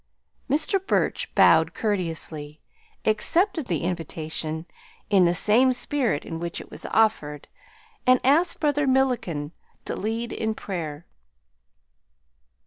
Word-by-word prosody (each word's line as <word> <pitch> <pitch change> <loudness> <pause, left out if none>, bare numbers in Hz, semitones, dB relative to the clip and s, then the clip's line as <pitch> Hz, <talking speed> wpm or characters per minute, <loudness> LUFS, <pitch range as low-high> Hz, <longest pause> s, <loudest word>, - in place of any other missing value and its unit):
Mr. 315 +7 +2
Burch 390 - 0
bowed - - +5
courteously, 165 -7 -2 0.5
accepted 315 - +1
the 165 -3 -1
invitation 160 -2 -3 0.5
"in 190 -3 +5
the 175 +1 +2
same 235 +8 +4
spirit 250 - -1
in 165 - -6
which 170 0 -4
it - - -12
was - - -6
offered," 150 -10 0 0.6
and 255 0 +6
asked 320 +7 +2
Brother 295 -2 +1
Milliken 245 - 0 0.3
to - - -3
lead 225 +3 -3
in 220 -1 -2
prayer. 165 -7 -6
210 Hz, 115 wpm, -24 LUFS, 165-260 Hz, 0.6 s, and